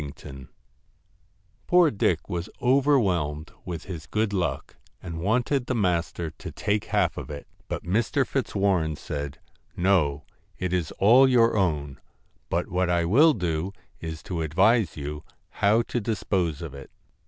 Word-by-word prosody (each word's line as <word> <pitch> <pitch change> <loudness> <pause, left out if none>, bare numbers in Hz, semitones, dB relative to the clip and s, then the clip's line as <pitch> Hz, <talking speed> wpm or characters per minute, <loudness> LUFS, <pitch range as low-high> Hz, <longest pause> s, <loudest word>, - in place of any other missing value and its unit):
TINGTON 70 -2 -9 1.2
Poor 175 -3 +5
Dick 100 - 0
was 85 0 -4
overwhelmed 100 - +2
with 85 -3 -5
his 85 -5 -8
good 110 -1 0
luck, 90 -3 -2
%S - - -32
and 85 -1 -6
wanted 125 +6 +1
the 130 - 0
master 85 -5 -1
to - - -9
take 105 0 -1
half - - +1
of - - -6
it; 70 -1 -7 0.2
but - - -4
Mr. 115 +9 +1
Fitzwarren 100 - 0
said: 70 -1 -5 0.4
'No. 85 -6 +2 0.3
It 90 -1 -2
is 90 -4 0
all 125 +7 +6
your 120 -3 +4
own; 75 -9 -1 0.5
but - - 0
what 90 0 0
I 85 -1 +2
will 145 - +5
do 90 - -2 0.3
is 80 -1 -6
to 85 -3 -3
advise 95 +5 +2
you 75 +1 -5 0.3
how 110 +3 +2
to 120 - -3
dispose 95 -7 -1
of 80 -5 -7
it.' 70 -1 -10
90 Hz, 150 wpm, -26 LUFS, 80-110 Hz, 1.2 s, all